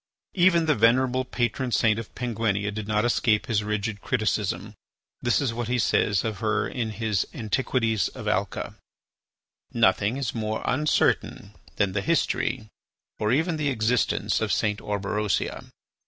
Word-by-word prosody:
Even 175 -3 +4
the 155 - +3
venerable 130 +2 +3
patron 125 0 -2
saint 110 -1 +3
of 115 - -9
Penguinia 110 -4 -1
did 110 0 -5
not 105 +1 +1
escape 115 -2 +2
his 105 -2 0
rigid 105 0 -2
criticism. 110 -4 -1 0.5
This 120 - +2
is 135 -5 -1
what 120 -1 -3
he 125 +1 0
says 105 -3 +2
of 110 -4 -3
her 110 0 0
in 120 -3 -3
his 110 -2 -1
"Antiquities 115 -2 0
of - - -8
Alca": - - -2 1.0
"Nothing 105 +6 +2
is 135 -5 -2
more 110 -1 -3
uncertain 130 -7 +1 0.2
than 100 -2 +1
the 100 +1 -1
history, 135 -5 0 0.5
or 105 0 +1
even 160 +5 +1
the 150 -2 0
existence, 120 -1 +1
of - - 0
St. 105 -1 0
Orberosia. 105 0 -2
110 Hz, 145 wpm, -25 LUFS, 105-125 Hz, 1.0 s, Even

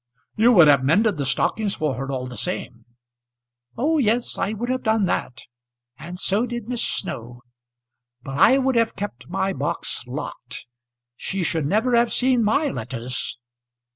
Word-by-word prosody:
"You 230 +3 +5
would 175 -7 +8
have 140 -3 +5
mended 200 +8 +3
the 140 -2 -2
stockings 200 +9 0
for 155 -3 -1
her 135 +2 -4
all 130 -1 -3
the 125 -1 -8
same." 120 -10 -5 0.9
"O 305 +6 +2
yes, 240 -1 +1
I 200 - -1
would 230 +3 -4
have 255 0 -1
done 220 -2 +2
that; 125 -8 -3 0.5
and 170 +7 -9
so 205 +6 +1
did 240 -2 -5
Miss 245 -1 0
Snow. 120 - -4 0.8
But 135 +1 -5
I 265 - +6
would 265 -1 +1
have 230 -1 +2
kept 125 - -6
my 190 +2 -1
box - - -2
locked. - - -7 0.5
She 190 +7 -3
should 160 -3 0
never 225 - +2
have 235 0 +3
seen 250 -2 +3
my 250 +8 +2
letters." 120 - -5
195 Hz, 165 wpm, -23 LUFS, -, 0.9 s, would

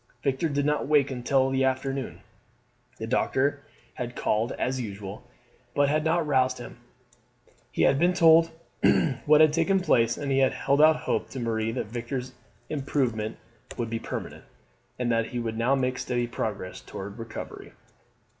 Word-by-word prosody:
Victor 140 +4 0
did 145 -1 0
not 150 -1 0
wake 145 -2 +3
until 130 +1 +1
the 135 0 +1
afternoon. 130 - -2 0.8
The 110 - -5
doctor 135 +4 +1 0.3
had 120 -1 -5
called 110 +2 0
as 130 0 -2
usual, 100 +1 -7 0.5
but 145 0 +3
had 155 +1 +1
not 160 +1 +1
roused 130 -3 +2
him. 120 - -10 0.9
He - - 0
had 135 - +4
been 175 +2 +3
told 165 -2 +6 0.8
what 150 +1 +7
had 155 -1 +6
taken 170 +4 +2
place, 115 -10 +2
and 140 -1 -3
had 135 -1 +3
held 140 +1 +1
out 155 0 +7
hope - - -1
to 135 - -6
Marie 115 -1 -1
that 130 - -2
Victor's 125 +3 -5 0.3
improvement 125 -7 -1 0.4
would 115 -1 -3
be 115 - -1
permanent, - - -6 0.5
and 125 -1 0
that 115 -1 +1
he 125 - -6
would 115 -1 -3
now 120 +4 +2
make 130 -1 -1
steady 120 -1 -1
progress 100 - -4
towards 100 - -8
recovery. 115 0 -8
130 Hz, 160 wpm, -27 LUFS, 115-145 Hz, 0.9 s, what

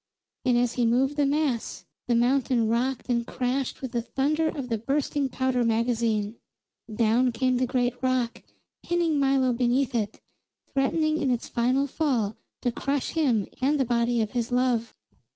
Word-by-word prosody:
And 250 -2 +3
as 245 0 +1
he 245 - +1
moved 265 +5 +2
the 290 -1 +2
mass, 285 -5 -1 0.2
the 240 - +2
mountain 245 -1 +2
rocked 240 +3 -1
and 240 -2 +1
crashed 260 +1 -2
with 260 - -4
the 235 - -1
thunder 300 +6 0
of 280 -5 -4
the 225 -3 -1
bursting 275 +3 -1
powder 260 -1 0
magazine. 230 -2 0 0.5
Down 230 +3 +2
came 255 +2 +1
the 255 0 +1
great 245 0 +1
rock, 255 -2 0 0.4
pinning 340 -3 0
Milo 270 -2 +3
beneath 250 +2 +1
it, 220 -3 -2 0.5
threatening 310 +3 +1
in 275 - +1
its 245 -2 -1
final 255 +3 +1
fall 255 -8 -1 0.3
to 245 - +1
crush 275 +3 -2
him 255 -11 +1 0.2
and 285 +3 +2
the 265 - +2
body 235 0 +1
of 215 - -5
his 240 -1 -2
love. 245 -2 +1
250 Hz, 165 wpm, -26 LUFS, 235-275 Hz, 0.5 s, And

